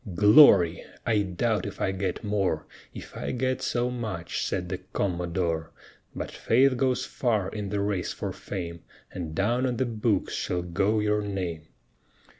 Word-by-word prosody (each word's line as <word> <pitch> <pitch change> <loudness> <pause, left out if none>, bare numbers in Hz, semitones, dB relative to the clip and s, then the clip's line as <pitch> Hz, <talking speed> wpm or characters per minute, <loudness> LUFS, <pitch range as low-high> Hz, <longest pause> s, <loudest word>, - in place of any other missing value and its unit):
"Glory! 100 - +7 0.2
I 110 -2 +3
doubt 105 +3 0
if 100 - -8
I 95 - +1
get 95 +2 -3
more, 100 -6 0 0.3
If - - -10
I - - -4
get 130 +1 -1
so 125 +1 0
much," 105 -9 -3
said 90 -2 -2
the 90 0 -4
Commodore; 85 -3 -2 0.5
"But - - -4
faith 130 +3 +3
goes 130 0 +1
far 110 -8 0
in 105 -1 -5
the 100 0 -1
race 100 -3 -1
for - - -4
fame, 85 -3 -6 0.3
And 80 -3 -5
down 120 +7 +1
on 125 -2 -2
the 130 - +1
books 110 -3 0
shall 90 -1 -2
go 100 +5 +1
your 105 0 +1
name." 90 -6 -4
100 Hz, 160 wpm, -27 LUFS, 90-115 Hz, 0.5 s, Glory